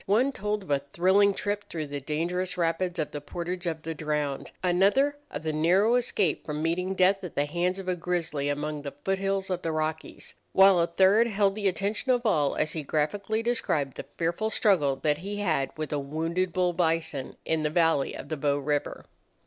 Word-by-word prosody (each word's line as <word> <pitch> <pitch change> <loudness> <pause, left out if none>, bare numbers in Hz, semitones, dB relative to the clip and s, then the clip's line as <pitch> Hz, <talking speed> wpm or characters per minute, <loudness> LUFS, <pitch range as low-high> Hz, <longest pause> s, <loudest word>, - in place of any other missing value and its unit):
One 235 +8 +3
told 210 -3 -3
of 180 - -8
a 140 - +3
thrilling 195 +3 +4
trip 205 0 -2
through 160 -2 -5
the 145 0 -5
dangerous 175 +5 -2
rapids 175 +1 0
of 155 -3 -2
the 145 - -5
Portage 175 +2 -4
of 160 -2 -3
the 165 - -3
Drowned; 150 -2 -2
another, 200 +11 +3
of 145 - -6
the 155 -1 -1
narrow 180 +9 +3
escape 210 -9 +1
from 150 0 -4
meeting 180 +3 -1
death 190 +1 +3
at 180 - -7
the 145 - +1
hands 175 +4 -1
of 190 -1 -7
a 185 - +1
grizzly 165 -5 -2
among 150 +1 -2
the 140 -1 -6
foot 195 0 +1
hills 195 -1 -1
of 180 -1 -1
the 165 - -2
Rockies; 155 0 -4 0.2
while 190 -1 +7
a 170 - +3
third 195 +6 +4
held 200 -3 +2
the 205 -1 -1
attention 200 +7 -1
of 245 -1 +1
all 150 -10 +2
as 155 - 0
he 160 - -3
graphically 195 +10 -1
described 155 - 0
the - - -7
fearful 170 +6 0
struggle 170 -12 +2
that 150 +2 0
he 200 +4 -5
had 165 -9 0
with 155 -1 -4
a 145 - 0
wounded 165 +6 -2
bull 180 0 +1
bison 165 -5 -1
in 160 -1 0
the 150 - 0
valley 160 -3 +2
of - - -8
the 155 - -2
Bow 145 0 +1
River. 145 +1 -2
175 Hz, 205 wpm, -27 LUFS, 155-195 Hz, 0.2 s, while